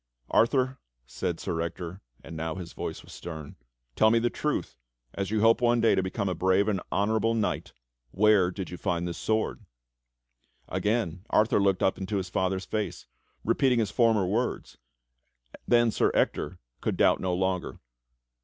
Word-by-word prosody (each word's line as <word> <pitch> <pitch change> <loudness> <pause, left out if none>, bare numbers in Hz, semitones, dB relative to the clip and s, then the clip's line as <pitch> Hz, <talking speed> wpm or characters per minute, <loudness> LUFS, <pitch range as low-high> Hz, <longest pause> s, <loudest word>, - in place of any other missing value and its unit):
"Arthur," 130 +2 +2 0.3
said 65 - -3
Sir 80 - -2
Ector, 85 +2 -5 0.2
and 80 - -9
now 80 0 -3
his 90 -3 -7
voice - - -5
was - - -13
stern, 80 -4 -8 0.4
"Tell 110 - +5
me 115 - +4
the 120 +1 +1
truth, 150 -1 -2 0.4
as 100 -1 -3
you 110 0 0
hope 115 +3 +5
one 120 0 +3
day 115 0 +4
to - - +2
become 95 +2 -2
a 95 - 0
brave 95 +4 +2
and 100 -4 0
honorable 110 +3 +1
knight, 110 -2 -1 0.4
where 100 +1 +4
did 95 0 -6
you 90 - -6
find 85 -2 -1
this 85 - -5
sword?" 110 0 -1 1.0
Again 105 -5 -1
Arthur 105 0 +3
looked 95 -2 +2
up 95 - +1
into 100 +2 -2
his 95 -2 -3
father's 95 0 -1
face, 105 +2 -3 0.4
repeating 125 +2 +2
his 110 -4 0
former 115 -5 +3
words; 115 +7 -2 0.9
then 120 -1 +4
Sir - - +2
Ector - - 0 0.2
could - - -1
doubt - - +4
no 90 -1 -1
longer. 95 0 -1
100 Hz, 165 wpm, -28 LUFS, 90-115 Hz, 1.0 s, Tell